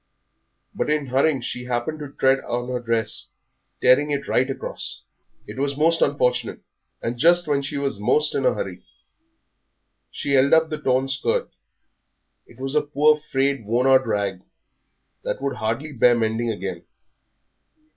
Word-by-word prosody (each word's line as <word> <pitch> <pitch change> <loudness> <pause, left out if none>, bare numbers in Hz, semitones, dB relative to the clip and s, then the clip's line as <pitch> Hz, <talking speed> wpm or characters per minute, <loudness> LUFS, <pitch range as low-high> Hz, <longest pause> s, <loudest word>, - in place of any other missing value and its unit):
But - - -2
in 150 -1 +1
hurrying 135 +2 +1
she 125 +1 -5
happened 125 +5 -2
to 145 -2 -7
tread 135 -1 +2
on 120 0 -4
her 125 -1 -2
dress, 115 -2 -1 0.5
tearing 135 +4 +5
it 140 -1 -2
right 130 +2 +1
across. 135 - -6 0.4
It - - -9
was 140 0 -1
most 165 +2 +3
unfortunate, 125 -4 +1 0.4
and 120 +1 -3
just 175 +3 +5
when 145 -2 +1
she 140 +1 -4
was 140 -7 -1
most 145 +8 +2
in - - -1
a - - +3
hurry. - - -5 1.3
She 140 - -4
held 140 0 +4
up 160 0 +4
the 155 - -3
torn 130 -1 +1
skirt. 460 - -1 1.0
It - - -18
was 135 +1 -3
a 150 - +3
poor, 150 +1 +3 0.2
frayed, 135 -2 +1
worn 120 +5 0
out 130 -1 +5
rag 100 -4 -1 0.8
that - - -3
would 140 0 -3
hardly 115 +8 -3
bear 120 -1 +4
mending 115 +1 0
again. 110 - -4
135 Hz, 155 wpm, -23 LUFS, 120-145 Hz, 1.3 s, tearing